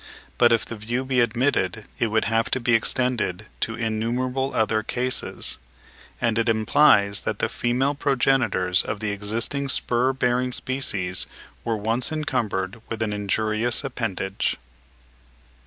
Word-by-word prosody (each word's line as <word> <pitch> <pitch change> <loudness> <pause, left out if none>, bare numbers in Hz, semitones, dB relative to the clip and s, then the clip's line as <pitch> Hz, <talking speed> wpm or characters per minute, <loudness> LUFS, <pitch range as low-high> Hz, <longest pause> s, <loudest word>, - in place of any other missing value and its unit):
But 120 -1 +6
if 115 -2 +3
this 115 - -7
view 120 +4 -2
be 130 -1 +1
admitted, 115 -4 +1
it 115 - +2
would 110 0 +1
have 115 0 +1
to 130 - 0
be 120 -1 +1
extended 115 -4 +1
to 115 - -1
innumerable 120 +4 -1
other 110 0 +2
cases; 125 +3 -2 0.6
and 115 -1 +1
it 115 - +1
implies 110 -2 +4
that - - -2
the - - +1
female 125 +4 0
progenitors 125 -10 +2
of 105 - -4
the 105 -1 -1
existing 115 +7 -1
spur 125 0 +1
bearing 125 -1 0
species 100 -11 -1 0.4
were 115 -1 -1
once 115 +7 0
encumbered 115 -9 -2
with 115 0 -2
an 105 -2 -2
injurious 110 +4 0
appendage. 110 -7 -2
115 Hz, 140 wpm, -24 LUFS, 110-125 Hz, 0.6 s, But